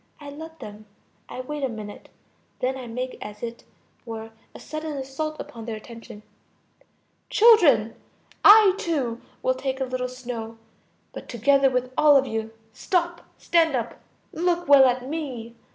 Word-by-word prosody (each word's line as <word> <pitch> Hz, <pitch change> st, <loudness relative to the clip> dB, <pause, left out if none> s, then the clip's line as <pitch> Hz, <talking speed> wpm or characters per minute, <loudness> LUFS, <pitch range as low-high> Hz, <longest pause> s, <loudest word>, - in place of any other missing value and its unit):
I 290 Hz, -1 st, -9 dB
let 320 Hz, +2 st, -10 dB
them. 210 Hz, -1 st, -10 dB, 0.4 s
I 255 Hz, -, -6 dB
wait 295 Hz, +2 st, -6 dB
a 265 Hz, -, 0 dB
minute, 215 Hz, -3 st, -9 dB, 0.5 s
then 260 Hz, +1 st, -1 dB
I 255 Hz, -2 st, -8 dB
make 250 Hz, +3 st, -5 dB
as 210 Hz, +1 st, -9 dB
it 235 Hz, 0 st, -6 dB, 0.4 s
were 225 Hz, -1 st, -7 dB, 0.2 s
a -, -, -9 dB
sudden 310 Hz, -1 st, -6 dB
assault 275 Hz, +4 st, -5 dB
upon 230 Hz, -2 st, -8 dB
their 225 Hz, -1 st, -4 dB
attention: 220 Hz, -1 st, -11 dB, 1.1 s
Children, 295 Hz, -, +5 dB, 0.5 s
I 415 Hz, -2 st, +8 dB
too 255 Hz, -9 st, -2 dB, 0.2 s
will 255 Hz, -, +2 dB
take 265 Hz, 0 st, -4 dB
a -, -, 0 dB
little 255 Hz, 0 st, -3 dB
snow, 240 Hz, -3 st, -7 dB, 0.6 s
but -, -, -10 dB
together 270 Hz, +3 st, +3 dB
with 255 Hz, 0 st, -2 dB
all 295 Hz, -2 st, +7 dB
of 270 Hz, -, +2 dB
you. 225 Hz, -2 st, -4 dB, 0.2 s
Stop. 345 Hz, -, -1 dB, 0.2 s
Stand 330 Hz, -4 st, +2 dB
up. 235 Hz, -2 st, -4 dB, 0.3 s
Look 350 Hz, 0 st, 0 dB
well 280 Hz, -2 st, +8 dB
at 255 Hz, 0 st, 0 dB
me. 265 Hz, -7 st, -5 dB
255 Hz, 150 wpm, -24 LUFS, 230-305 Hz, 1.1 s, I